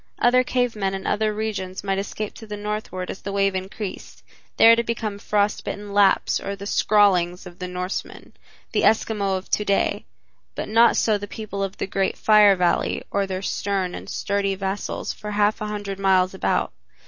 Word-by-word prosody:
Other 250 +1 +4
cave 245 -2 0
men 195 -2 -1
in 190 - -6
other 215 0 +1
regions 205 -4 -4
might 195 -1 0
escape 205 +1 -4
to 220 - -12
the 210 0 -5
Northward 210 -3 -4
as - - -9
the 200 - -5
wave 195 0 +1
increased, 190 +1 -6 0.3
there 230 0 +8
to 235 - +1
become 220 -3 -3
frost 205 0 0
bitten 205 -1 -6
Lapps 200 -1 +3
or 200 - -4
the 200 0 -9
"Skrallings" 190 -4 +2
of 180 0 -12
the 180 - -4
Norsemen, 180 +1 -5 0.4
the - - +1
Eskimo 205 -3 +2
of 185 - -9
to 210 - +2
day, 200 -1 0 0.5
but - - -4
not 230 +2 +5
so 215 -2 +2
the 205 - -6
people 205 -2 -6
of 195 0 -3
the - - -2
great 195 0 -1
Fire 210 -2 +6
Valley 180 -1 0
or 200 -1 0
their 190 0 -4
stern 195 -3 -1
and - - -8
sturdy 200 -1 -1
vassals 195 +1 -3
for 210 - -8
half 210 +1 +1
a 215 - -2
hundred 205 -2 -5
miles 190 -1 +3
about. 190 - 0
200 Hz, 190 wpm, -23 LUFS, 190-210 Hz, 0.5 s, there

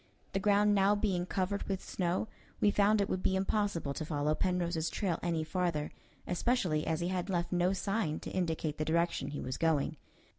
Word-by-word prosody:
The 195 - +1
ground 205 +1 +4
now 200 +1 +4
being 190 -4 0
covered 190 +2 -1
with 190 -1 0
snow, 180 +3 -1 0.3
we 205 - +4
found 210 +1 +4
it 200 - +1
would 185 - -2
be 190 - +1
impossible 195 -6 0
to 155 - -4
follow 150 -1 0
Penrose's 170 -2 0
trail 185 -5 -1
any 165 -2 0
farther, 160 -3 -1 0.3
especially 180 -5 0
as 160 +1 0
he 175 - 0
had 185 0 -2
left 175 -2 -1
no 180 0 +2
sign 195 -4 -1
to - - -6
indicate 160 -4 -1
the - - +1
direction 170 -2 +1
he 145 0 -4
was 130 - -4
going. 160 -2 +1
180 Hz, 190 wpm, -32 LUFS, 160-195 Hz, 0.3 s, ground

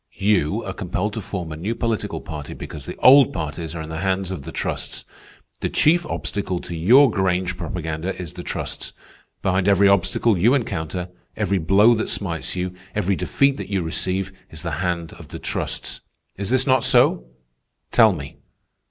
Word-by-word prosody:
You 95 -7 +1
are - - -4
compelled 105 +3 -2
to 110 - -4
form 90 -5 -5
a - - -4
new 100 +9 -3
political 115 -3 -2
party 75 -2 -7
because - - -8
the - - -5
old 135 0 +8
parties 80 +2 -4
are 80 - -4
in 80 - -8
the 80 - -4
hands 95 0 -1
of 95 - -4
the - - -8
trusts. - - -3 0.5
The - - -1
chief 175 +3 +3
obstacle 95 -3 -3
to - - -7
your 120 - +6
Grange 95 -2 0
propaganda 85 0 -4
is 85 -4 -6
the - - -7
trusts. - - -4 0.5
Behind 95 0 +1
every 100 0 +5
obstacle 100 +2 +2
you 120 +9 +5
encounter, 90 - -3 0.3
every 100 -2 +1
blow 100 +8 +5
that 110 -1 -1
smites 85 -5 -2
you, 90 0 -2 0.2
every 95 +2 +1
defeat 135 +10 +1
that - - -6
you 95 -3 0
receive, 95 +4 -1 0.2
is 80 0 -8
the 85 - -3
hand 85 -3 -2
of - - -11
the - - -7
trusts. - - -4 0.3
Is 100 0 -4
this 130 0 +3
not 130 -3 +3
so? 60 - +4 0.7
Tell 110 -3 +6
me." 70 -6 -7
95 Hz, 180 wpm, -22 LUFS, 85-105 Hz, 0.7 s, old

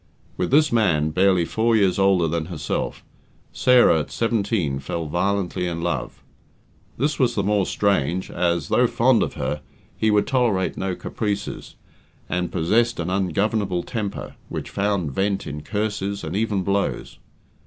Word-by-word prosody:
With 90 - -1
this 150 +3 +4
man, 85 -10 +2
barely 90 0 +3
four 115 +5 +1
years 100 -3 +2
older 95 -3 +3
than 80 0 -1
herself, 80 -3 -4 0.5
Sarah, 125 -10 +5
at 75 - -4
seventeen, 105 - 0
fell 80 +4 -4
violently 90 +2 -1
in 85 -1 -3
love. 85 0 -3 0.7
This 145 +3 0
was 125 -3 +2
the 100 - 0
more 100 -1 +1
strange 95 -3 0
as, 85 -3 0
though - - +4
fond - - +3
of - - -2
her, 75 -1 -3 0.3
he 110 - +1
would 105 -1 +3
tolerate 120 -9 +1
no 95 -1 -2
caprices, 105 0 -4 0.5
and 90 -1 -2
possessed 115 +8 +1
an 85 +2 -2
ungovernable 95 0 0
temper, 105 -4 -4 0.2
which - - -5
found 100 -6 0
vent 100 +5 -1
in 75 +1 -6
curses, 105 0 -3
and - - -4
even 105 -2 0
blows. 100 +1 -2
100 Hz, 150 wpm, -23 LUFS, 85-105 Hz, 0.7 s, Sarah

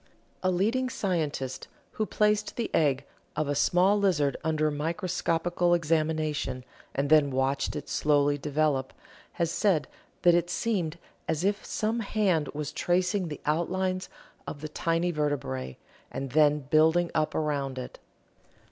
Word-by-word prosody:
A 185 - +1
leading 225 +8 +1
scientist 155 - -2 0.2
who 215 - -2
placed 210 0 +1
the 235 - -3
egg 140 -3 +2 0.3
of 155 - -1
a 145 - 0
small 180 +7 +3
lizard 160 -8 +2
under 155 -1 +1
microscopical 175 +2 0
examination 155 -5 0 0.3
and 140 +2 -1
then 150 -2 +6
watched 135 +2 0
it 150 - -5
slowly 145 -1 +2
develop 145 -2 0 0.4
has 170 -2 -1
said 175 -5 +2 0.4
that 175 - +7
it 175 0 +2
seemed 175 -6 -1 0.3
as 160 +1 -1
if 205 +2 0
some 220 +2 -1
hand 195 -8 +1
was 150 -1 -3
tracing 180 +3 0
the 150 - -7
outlines 185 +4 -1 0.4
of 145 - -6
the 155 - -5
tiny 165 +3 0
vertebrae, 100 - -2 0.3
and 135 -2 -5
then 150 0 +4
building 160 +3 +4
up 155 -1 0
around 140 -4 -1
it. 125 - -7
155 Hz, 140 wpm, -28 LUFS, 145-180 Hz, 0.4 s, that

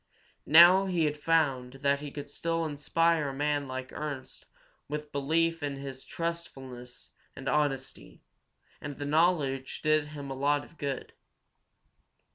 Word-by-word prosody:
Now 175 +5 +8
he 175 -4 +1
had 150 0 0
found 145 -5 +1
that 140 +1 +1
he 145 0 -6
could 145 0 -7
still 165 +2 -1
inspire 155 +1 +1
a - - -5
man 145 0 0
like 130 0 -6
Ernst 145 -4 -6 0.4
with 150 0 -5
belief 165 +4 +1
in 145 -1 -2
his 135 -1 -7
truthfulness 135 -8 -6 0.2
and 135 - -8
honesty, 135 -3 -2 0.6
and 145 -1 -6
the 145 - -4
knowledge 145 -4 +1
did 155 -1 +3
him 145 -2 -7
a - - -4
lot 145 +2 +1
of 170 - -21
good. 140 -2 -4
145 Hz, 140 wpm, -29 LUFS, 135-160 Hz, 0.6 s, Now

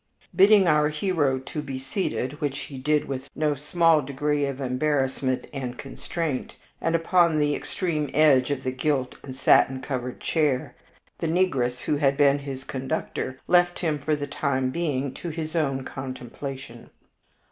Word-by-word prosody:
Bidding 200 0 +7
our 150 -2 +4
hero 150 -4 +1
to 130 +4 -5
be 135 -3 -5
seated, 135 0 -3
which 140 -2 -1
he 135 -2 -8
did 150 +2 +1
with 135 -1 -5
no 150 -1 +1
small 160 +2 +3
degree 145 +1 -1
of 135 -1 -5
embarrassment 130 -1 0
and 125 -3 -4
constraint, 145 +1 -4 0.3
and 165 0 +1
upon 170 -1 +3
the 145 -1 +2
extreme 155 -2 -2
edge 140 -3 +4
of 140 -2 -2
the 130 - -1
gilt 130 -1 -1
and 130 -2 -8
satin 130 0 +4
covered 125 -2 -4
chair, 145 -6 0 0.5
the 165 - -1
negress 135 -9 +1
who 150 - 0
had 140 -1 +2
been 140 -1 +4
his 135 -2 -6
conductor 130 -1 -4
left 175 0 +4
him 155 -4 -1
for 150 +2 0
the 145 -1 -3
time 135 -2 -1
being 140 -5 -1
to 175 - -6
his 160 0 -5
own 135 -5 0
contemplation. 130 -1 -7
145 Hz, 160 wpm, -25 LUFS, 130-155 Hz, 0.5 s, Bidding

